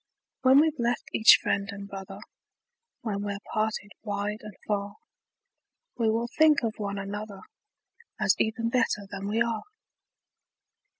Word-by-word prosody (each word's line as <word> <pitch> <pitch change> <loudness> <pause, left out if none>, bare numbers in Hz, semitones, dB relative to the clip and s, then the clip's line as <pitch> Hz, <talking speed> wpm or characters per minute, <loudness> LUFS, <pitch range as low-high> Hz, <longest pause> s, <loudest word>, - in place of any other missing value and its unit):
When 260 +2 +7
we've 310 -2 +2
left 235 0 -1
each 220 - +8
friend 200 +1 0
and 200 0 -8
brother, 195 -1 -8 0.8
When 205 -4 -3
we're 200 -1 -3 0.2
parted 215 -1 -1
wide 205 0 -3
and 210 -2 -10
far, 200 -1 -2 1.0
We 230 -2 +1
will 230 +2 0
think 310 -3 +6
of 225 -2 0
one 200 -1 -3
another, 200 +1 -6 0.8
As - - +4
even 230 +1 0
better 230 -4 +1
than 200 0 -5
we 225 +3 +2
are. 230 -2 -2
215 Hz, 135 wpm, -27 LUFS, 200-230 Hz, 1.0 s, each